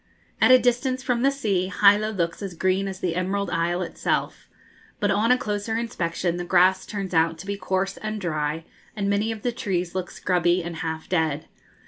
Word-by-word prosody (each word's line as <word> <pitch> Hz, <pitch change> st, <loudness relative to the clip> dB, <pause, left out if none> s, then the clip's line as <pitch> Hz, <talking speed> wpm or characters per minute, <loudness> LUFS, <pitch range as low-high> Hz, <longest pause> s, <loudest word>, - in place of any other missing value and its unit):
At -, -, +6 dB
a 255 Hz, -, +9 dB
distance 255 Hz, +1 st, 0 dB
from 245 Hz, -2 st, 0 dB
the 270 Hz, -, +4 dB
sea, 205 Hz, -10 st, 0 dB
Hilo 205 Hz, +1 st, +6 dB
looks 170 Hz, -5 st, -2 dB
as 195 Hz, -3 st, -5 dB
green 190 Hz, +3 st, +1 dB
as 190 Hz, -1 st, -6 dB
the 175 Hz, -2 st, -1 dB
Emerald 190 Hz, +1 st, -1 dB
Isle 175 Hz, +2 st, 0 dB
itself; -, -, -2 dB, 0.5 s
but 205 Hz, -2 st, +1 dB
on 215 Hz, +4 st, +2 dB
a 250 Hz, -, +5 dB
closer 210 Hz, -1 st, -2 dB
inspection 175 Hz, -6 st, -2 dB
the 175 Hz, -, -3 dB
grass 185 Hz, +1 st, +3 dB
turns 195 Hz, -3 st, -4 dB
out 165 Hz, 0 st, +2 dB
to 170 Hz, -, -9 dB
be 200 Hz, 0 st, -2 dB
coarse 190 Hz, 0 st, -2 dB
and 215 Hz, 0 st, -4 dB
dry, 155 Hz, -3 st, -2 dB, 0.3 s
and 200 Hz, -1 st, -1 dB
many 210 Hz, +3 st, +1 dB
of 220 Hz, -2 st, -7 dB
the 245 Hz, -, +1 dB
trees 185 Hz, -7 st, -2 dB
look 185 Hz, -1 st, -3 dB
scrubby 175 Hz, -1 st, +1 dB
and 170 Hz, -1 st, -6 dB
half 160 Hz, -1 st, -4 dB
dead. 160 Hz, -4 st, 0 dB
190 Hz, 195 wpm, -24 LUFS, 175-215 Hz, 0.5 s, a